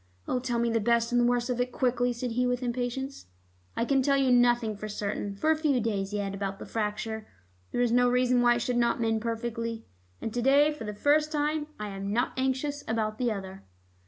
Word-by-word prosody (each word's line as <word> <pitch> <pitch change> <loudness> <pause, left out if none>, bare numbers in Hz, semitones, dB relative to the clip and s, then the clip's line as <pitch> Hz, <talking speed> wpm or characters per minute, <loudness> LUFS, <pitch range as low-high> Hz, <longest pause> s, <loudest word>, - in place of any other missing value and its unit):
"Oh, 255 - 0
tell 245 -1 -2
me 235 0 +1
the 230 - +2
best 235 +2 +2
and 245 0 +3
the - - +3
worst 245 0 +1
of 245 0 0
it 250 0 -1
quickly," 245 -1 +1
said 240 0 -4
Hugh 250 +2 +1
with 245 0 -1
impatience. 250 - -3 0.5
"I 230 - +1
can 270 +1 +2
tell 275 +1 +3
you 265 -2 +3
nothing 240 -3 +3
for 215 +1 -6
certain 205 -1 -3
for 310 +11 +2
a - - +4
few 300 -5 +1
days 205 -4 -1
yet 200 -1 -2
about 195 0 -3
the - - -8
fracture. 220 0 -3 0.4
There 245 - 0
is 240 -2 +2
no 245 +1 +4
reason 250 0 +3
why 240 0 +5
it 240 - -1
should 250 -1 -1
not 235 -1 +2
mend 225 -1 +1
perfectly. 230 0 -3 0.3
And 225 - -4
to 245 - -1
day 280 +4 +5
for 260 -7 -8
the 210 0 -5
first 300 +6 +2
time 300 0 0
I 210 0 -4
am 195 0 -4
not 240 +4 0
anxious 265 +2 -1
about 220 -1 -1
the 245 -2 +1
other." 195 -2 -6
240 Hz, 230 wpm, -28 LUFS, 220-255 Hz, 0.5 s, why